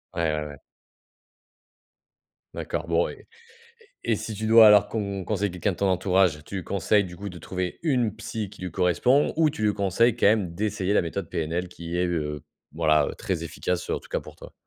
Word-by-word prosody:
Ouais, - - -1
ouais, 75 0 -2
ouais. 70 -1 -9 2.0
D'accord, 85 - -4
bon 85 0 +2
et - - -12 0.8
et - - +2
si 110 - -5
tu 110 +1 -3
dois 110 0 +9
alors 105 -1 +6
con 100 -3 -3
conseille 105 -2 -1
quelqu'un 90 +3 -1
de - - -11
ton 100 - +1
entourage, 90 -4 +2
tu 95 -2 -5
conseilles 100 +2 +1
du 90 -1 -9
coup 100 +2 -6
de 90 - -10
trouver 90 +2 -4
une 125 -9 +1
psy 110 -2 -5
qui - - -15
lui 90 - -4
correspond 95 - +2
ou 160 -2 +4
tu 145 - -7
lui 105 -1 +3
conseilles 105 +4 +2
quand - - 0
même 100 -5 +2
d'essayer 100 0 -1
la - - +4
méthode 85 +1 -4
PNL 85 +3 -2
qui 85 0 -6
est, 90 - +2
heu, 75 -3 -3 0.3
voilà, 75 -2 +3
très 85 -4 -3
efficace, 90 +2 -3
en - - -1
tout - - -18
cas - - -1
pour - - -13
toi. - - -13
95 Hz, 200 wpm, -25 LUFS, 85-105 Hz, 2.0 s, dois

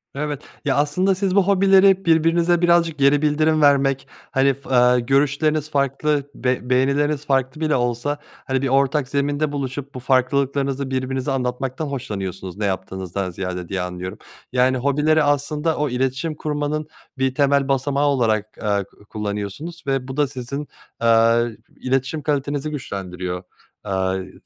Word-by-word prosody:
Evet. 145 0 -3 0.2
Ya, 135 -2 +2
aslında 165 +7 +2
siz 190 0 -1
bu 200 -2 +4
hobileri 195 -1 +5
birbirinize 165 +1 +3
birazcık 170 -2 +3
geri 140 +1 +4
bildirim 155 +1 +2
vermek, 135 -2 +3 0.2
hani 135 +1 +3
f 140 - -14
eee 125 -1 +5
görüşleriniz 140 +4 +1
farklı, 140 +1 0
be 125 -1 -1
beğenileriniz 140 +3 +1
farklı 135 +1 0
bile 155 -1 +2
olsa, 120 +3 -1 0.3
hani, 130 -1 0
bir 135 - 0
ortak 135 +1 +2
zeminde 145 +2 0
buluşup 140 0 -4
bu - - -4
farklılıklarınızı 135 +1 0
birbirinize 130 +1 -2
anlatmaktan 130 +2 -2
hoşlanıyorsunuz 100 -8 -5
ne 105 - -1
yaptığınızdan 95 -1 -3
ziyade 90 -1 -5
diye 95 -2 -2
anlıyorum. 90 +2 -5 0.3
Yani, 130 +1 +3
hobileri 150 +4 +2
aslında 150 +2 0
o 150 0 0
iletişim 130 +5 -1
kurmanın 150 0 -2 0.3
bir 130 0 0
temel 140 -1 +3
basamağı 140 +1 +1
olarak, 110 -6 0
eee, 100 -2 +1
ku 100 +1 -22
kullanıyorsunuz 105 - -5
ve 135 -2 -1
bu 130 +1 -6
da 145 -1 +3
sizin, 135 +2 -6 0.3
eee, 115 0 +3 0.2
iletişim 135 +4 -1
kalitenizi 145 0 -1
güçlendiriyor, 90 -9 -5 0.4
eee, 95 -1 -2
135 Hz, 140 wpm, -21 LUFS, 125-150 Hz, 0.4 s, hobileri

